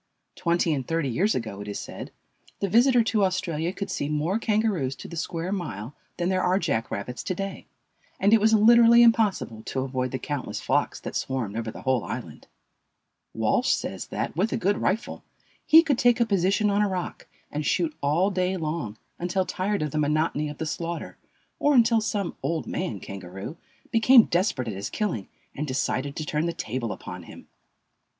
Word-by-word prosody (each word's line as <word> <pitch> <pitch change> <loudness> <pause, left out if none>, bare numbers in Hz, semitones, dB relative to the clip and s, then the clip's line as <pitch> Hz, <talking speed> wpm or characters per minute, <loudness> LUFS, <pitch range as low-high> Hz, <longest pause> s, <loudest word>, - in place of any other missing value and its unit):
Twenty 170 -1 +1
and 135 -4 -3
thirty 165 -4 0
years 190 - +1
ago, 110 -4 -4
it 105 - -8
is 100 - -4
said, - - -7 0.5
the 200 - 0
visitor 240 +4 +5
to 220 -2 +1
Australia 175 -3 0
could 200 0 -5
see 150 -6 -2
more 155 +8 0
Kangaroos 210 - 0
to - - -9
the 170 - -8
square 165 +2 -3
mile 145 - -4 0.2
than 175 0 0
there 185 -1 +1
are 185 +1 +2
jack 140 - -1
rabbits 120 +5 -4
to 185 - -3
day, 195 +2 -5 0.5
and 200 +3 +4
it 225 - +6
was 220 +1 +5
literally 235 +2 +7
impossible 210 - +2
to 130 - -2
avoid 130 -1 -2
the 130 - -3
countless 145 0 -4
flocks - - 0
that - - -6
swarmed 125 -6 -2
over 115 0 -3
the - - -9
whole 130 -3 +1
island. - - -7 0.9
Walsh - - +2
says - - -4
that, - - -3
with 195 +7 +1
a - - 0
good 200 +3 +1
rifle, 215 +5 -1 0.4
he 325 +1 +8
could 285 -6 +1
take 245 0 +4
a 235 - +4
position 200 +1 +2
on 200 +1 +2
a 205 - +2
rock 185 -2 -4 0.2
and 150 - -2
shoot 160 +1 0
all 165 +8 +2
day 185 0 0
long, 155 - -3 0.2
until 180 +2 0
tired 195 -1 -1
of 150 - -3
the 155 - -1
monotony 150 0 +1
of 145 - -8
the 160 - -3
slaughter, 170 +2 -4 0.4
or 290 0 +3
until 230 -2 +5
some 205 -3 -2
"old 165 -1 -1
man" 150 - -3
kangaroo 95 - -8 0.4
became 230 +2 +7
desperate 170 - 0
at 110 - -3
his 100 +2 -5
killing 175 - -2 0.3
and 150 +2 -4
decided 140 +1 -1
to 155 - -4
turn 150 +2 -1
the 170 - -2
table 115 -3 -3
upon 90 -2 -7
him. 85 - -13
170 Hz, 190 wpm, -26 LUFS, 135-205 Hz, 0.9 s, he